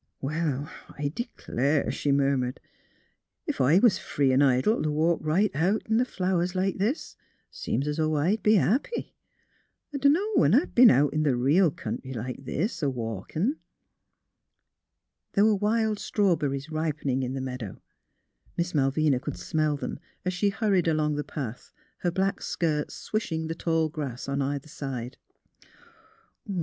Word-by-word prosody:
'^ - - -52 0.2
Well, 145 -1 -2 0.3
I 145 -1 -1
d'clare," 145 - -1
she 145 - -1
murmured. 135 -2 +1 0.4
" - - -46
Ef - - -1
I 140 +7 +5
was 200 -3 +4
free 135 -2 +1
'n' 130 - +4
idle 135 - +3
t' 155 - 0
walk 160 +3 +2
right 185 +7 +2
out 185 +8 +1
in 225 +2 +3
th' - - -6
flowers 185 -2 -1
like 190 +1 0
this, 230 - -1 0.4
seems 140 - -2
's 150 +1 -2
'o' 155 0 +1
I'd 180 +9 +1
be 215 +1 +4
happy. 255 - 0 0.8
I - - -1
dunno 290 +8 +4
when 150 +9 +5
I've 290 +7 +2
b'en 245 0 +8
out 140 +2 +3
in 155 0 +1
th' 140 -4 +2
reel 155 +9 +4
country 130 -2 -6
like 125 +3 -6
this, 190 - -2
a 145 - +2
walkin'." 125 - -2 1.8
There 200 - +4
were 220 - +5
wild 215 +1 +1
strawberries 160 -8 0
ripening 155 -4 -1
in 130 +1 -3
the - - -3
meadow; 125 -6 -5 0.8
Miss 170 +1 -1
Malvina 140 -1 +2
could 140 +2 -5
smell 155 -3 0
them, - - -5 0.3
as 185 - 0
shei 200 +3 +1
hurried 200 -4 +1
along 155 -2 +1
the 150 0 -2
path, 125 -7 -6 0.3
her 175 - 0
black 190 +3 -1
skirts 155 -3 -1
swishing 165 -7 -3
the 160 - -3
tall 165 -1 0
grass 140 -5 -5
on 140 0 -1
either 140 +1 -2
side. 130 -5 -6
155 Hz, 160 wpm, -27 LUFS, 140-190 Hz, 1.8 s, b'en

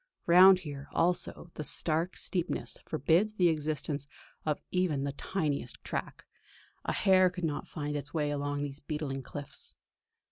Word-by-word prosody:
Round 185 +2 +8
here 145 -5 -7
also 175 0 +1
the 150 - -5
stark 165 +4 +2
steepness 180 -2 -2
forbids 170 +8 +2
the 180 -4 +4
existence 150 -2 -1 0.4
of 150 - +1
even 175 -7 +1
the 140 - -1
tiniest 145 -5 -2
track; - - -4 0.6
a - - -1
hare 185 -2 +5
could 180 0 -7
not 150 -2 -3
find 150 -2 -4
its 145 0 -4
way 150 -3 0
along 145 0 -2
these 140 -1 -5
beetling 145 -2 -4
cliffs. 140 +2 -7
155 Hz, 145 wpm, -31 LUFS, 145-180 Hz, 0.6 s, Round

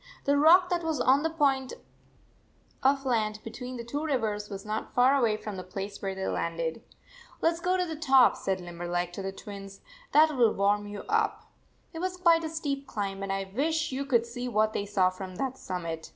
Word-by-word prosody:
The 285 - +2
rock 345 +5 +6
that 345 -1 0
was 320 -2 -1
on 265 +2 +4
the 325 - 0
point 275 -5 +1 1.1
of 275 +1 +2
land 220 -4 +1
78 215 - -13
between 250 +3 -7
the 235 - -5
two 285 +6 -4
rivers 220 -8 -1
was 195 -1 -7
not 215 +1 -4
far 255 +3 +5
away 230 -6 +2
from 210 -2 -6
the 185 - -5
place 195 +2 -6
where 195 -1 -3
they 190 0 -4
landed. 165 +3 -2 0.3
" - - -22
Let 330 - +4
s 335 - -8
go 365 +2 +1
to 365 - +1
the 320 -2 -5
top," 270 -5 +5
said 190 -1 -2
Limberleg 175 0 -3
to 195 - -5
the 195 0 -3
Twins. 195 0 -10 0.3
"That 310 0 +5
will 235 -4 +4
warm 205 +1 +1
you 205 0 -7
up." 435 -1 0 0.4
It 325 - -6
was 365 +1 -2
quite 335 -2 +4
a 320 - -2
steep 285 -4 -3
climb, 195 -2 -4
and 195 0 -3
I 195 0 -3
wish 310 +3 0
you 265 +2 -2
could 240 -4 +2
see 245 +1 -5
what 215 -2 +1
they 200 - -2
saw 190 -2 +2
from 185 0 -8
that 260 +5 -2
summit. 165 -8 -5
235 Hz, 220 wpm, -28 LUFS, 195-295 Hz, 1.1 s, rock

